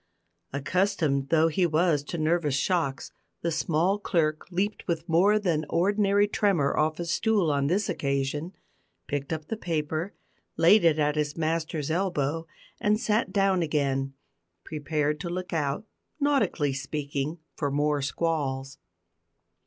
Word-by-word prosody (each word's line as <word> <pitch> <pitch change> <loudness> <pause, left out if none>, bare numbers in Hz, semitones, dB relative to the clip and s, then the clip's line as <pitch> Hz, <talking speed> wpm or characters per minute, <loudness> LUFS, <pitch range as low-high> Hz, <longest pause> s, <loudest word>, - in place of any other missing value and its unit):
Accustomed 145 -2 0
though 165 0 +4
he 175 +3 +2
was 160 -2 +2
to 170 - -4
nervous 155 -2 +1
shocks, 150 -3 -1 0.3
the 170 - 0
small 170 +5 +1
clerk 155 -6 0
leaped 195 +4 -2
with 165 -2 -2
more 190 +6 +4
than 170 -7 0
ordinary 200 +3 +3
tremor 195 -9 +1
off 155 +1 +1
his 170 -1 -3
stool 205 -6 +2
on 140 -1 +1
this 195 +6 +1
occasion, 140 +5 -2 0.5
picked 140 0 -3
up 155 -1 -3
the - - -1
paper, 160 0 -2 0.4
laid 175 +5 +6
it 165 -2 +4
at 150 -1 +1
his 150 0 -1
master's 160 -2 -1
elbow, 165 -3 -1 0.3
and 210 +1 +2
sat 215 -3 0
down 195 -2 +2
again, 135 -4 0 0.5
prepared 150 -1 -1
to 170 - -4
look 180 +1 -4
out 150 +4 -1 0.3
nautically 275 - +1
speaking 140 +2 -3 0.2
for 145 - -1
more 145 +1 +1
squalls. 135 -2 -2
160 Hz, 135 wpm, -27 LUFS, 145-185 Hz, 0.5 s, laid